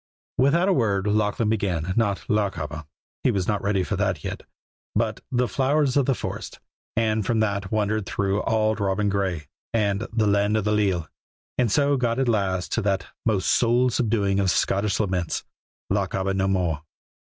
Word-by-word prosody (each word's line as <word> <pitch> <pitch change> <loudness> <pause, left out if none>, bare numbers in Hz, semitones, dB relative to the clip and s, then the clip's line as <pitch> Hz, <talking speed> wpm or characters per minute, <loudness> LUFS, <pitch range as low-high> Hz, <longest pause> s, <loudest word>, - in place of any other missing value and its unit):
Without 155 +8 +4
a 195 - +4
word 100 - +1
Lachlan 105 +1 +1
began, 95 -5 -1
not 105 -4 0
"Lochaber" 80 -8 -1 0.4
he - - +2
was 95 -2 0
not 105 -2 0
ready 100 -2 +1
for - - -2
that - - -1
yet - - -4 0.5
but 110 0 0
"The 125 -1 +2
Flowers 135 +4 +1
o' 145 - +5
the 135 0 +1
Forest," - - -6 0.4
and 110 -1 +1
from 115 +2 0
that 100 -2 -1
wandered 110 -2 0
through 100 +2 0
"Auld 110 0 +1
Robin 100 +1 +1
Gray" 95 -5 -1 0.3
and 105 0 +1
"The 110 -1 +1
Land 100 +1 +2
o' - - +1
the 105 +1 0
Leal," 95 -6 +1 0.5
and 120 -4 +2
so 145 +2 +3
got 120 -2 0
at 135 -1 +1
last 95 -5 0
to - - +1
that 95 -1 0 0.2
most 100 -4 +1
soul 120 +1 +3
subduing 105 -5 +1
of 95 -1 +2
Scottish 100 +3 +1
laments, 90 -5 -1 0.5
"Lochaber 95 0 0
No 95 0 +1
More." 90 -5 0
105 Hz, 175 wpm, -24 LUFS, 95-115 Hz, 0.5 s, o